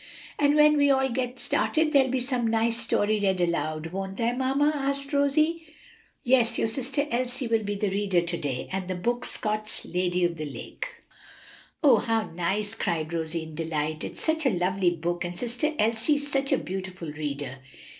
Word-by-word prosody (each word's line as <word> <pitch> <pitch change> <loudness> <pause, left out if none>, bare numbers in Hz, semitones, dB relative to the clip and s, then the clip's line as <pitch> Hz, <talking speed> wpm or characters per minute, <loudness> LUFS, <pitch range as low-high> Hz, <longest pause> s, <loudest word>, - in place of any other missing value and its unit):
"And 290 0 +4
when 300 0 +6
we 285 0 +4
all 265 -1 +3
get 250 0 -2
started 305 +7 +1
there'll 270 -2 +5
be 260 +1 0
some 250 -2 -1
nice 225 +1 +2
story 215 -2 +2
read 190 -2 +1
aloud, 165 -2 -1
won't 195 +1 -4
there, 235 +1 0
mamma?" 270 +3 +2
asked 275 0 -2
Rosie. 305 +4 +2 0.6
"Yes; 245 -2 +3
your - - +1
sister 270 +4 -1
Elsie 250 +2 -1
will 225 -1 +1
be 205 0 -2
the 200 -1 -1
reader 195 -3 +2
to 170 0 -2
day, 135 -5 -3
and 185 -1 -3
the 185 - -2
book 240 +7 -1
Scott's 215 0 -2
'Lady 180 0 0
of 170 -1 -1
the 155 - -4
Lake.'" - - -7 0.9
"Oh, 265 -6 +7
how 225 0 0
nice!" 195 +5 -1
cried 165 -7 -2
Rosie 165 0 -2
in 160 -1 -10
delight; 155 -1 -2
"it's - - -7
such 315 -2 +1
a 205 -9 +1
lovely 185 +1 +2
book, 175 +1 -2
and 175 0 -5
sister 250 - -1
Elsie's 240 +7 +1
such 275 0 0
a - - +4
beautiful 185 -3 -5
reader." 145 -3 -4
220 Hz, 185 wpm, -27 LUFS, 175-265 Hz, 0.9 s, Oh